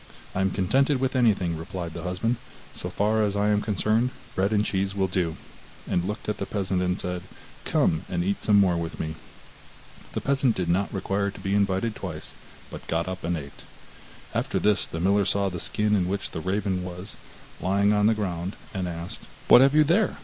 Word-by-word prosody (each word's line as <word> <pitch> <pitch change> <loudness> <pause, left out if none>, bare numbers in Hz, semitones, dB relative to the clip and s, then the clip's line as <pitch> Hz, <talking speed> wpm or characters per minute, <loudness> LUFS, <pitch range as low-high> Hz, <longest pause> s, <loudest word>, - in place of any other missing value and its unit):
'I 95 - 0
am 95 - +3
contented 130 +10 +2
with 130 0 0
anything,' 100 -9 +3
replied 85 +1 -5
the 85 - -6
husband, 90 +7 -1 0.4
'so - - -5
far 110 +2 +1
as 105 -1 +1
I 105 +1 +2
am 105 0 +3
concerned, 110 +3 +1 0.2
bread 95 +2 +1
and 105 0 +2
cheese 95 0 -1
will 95 -1 +2
do,' 90 -3 -1 0.5
and 85 - +1
looked 105 +2 -4
at 105 - -1
the - - -3
peasant 95 -3 -1
and 90 +1 0
said: 90 0 -3 0.4
'Come 80 - +2
and 85 -1 0
eat 100 +2 -1
some 105 -1 +5
more 90 -3 +4
with 85 0 -4
me.' 80 0 -2 1.0
The - - -2
peasant 135 -3 +2
did 90 -2 -1
not 95 +3 +1
require 100 +1 -1
to 100 - -10
be 95 0 -2
invited 100 +2 +1
twice, - - -6 0.4
but - - -9
got 85 +1 0
up 95 0 -5
and 85 0 0
ate. 70 -2 -9 0.7
After - - 0
this 105 -1 +2
the 80 - -5
miller 100 +3 +3
saw 100 +1 +1
the 90 -2 -5
skin 105 +4 +1
in 90 -3 +1
which 100 +1 -2
the 80 - -4
raven 95 0 -1
was, 90 +2 -6 0.5
lying 100 +3 +3
on 105 0 +4
the 110 - +4
ground, 90 -2 -3 0.2
and 95 -3 -2
asked: 85 0 -5 0.3
'What 125 - +10
have 135 +2 +5
you 155 - +7
there? 175 +7 +2
95 Hz, 205 wpm, -26 LUFS, 90-105 Hz, 1.0 s, What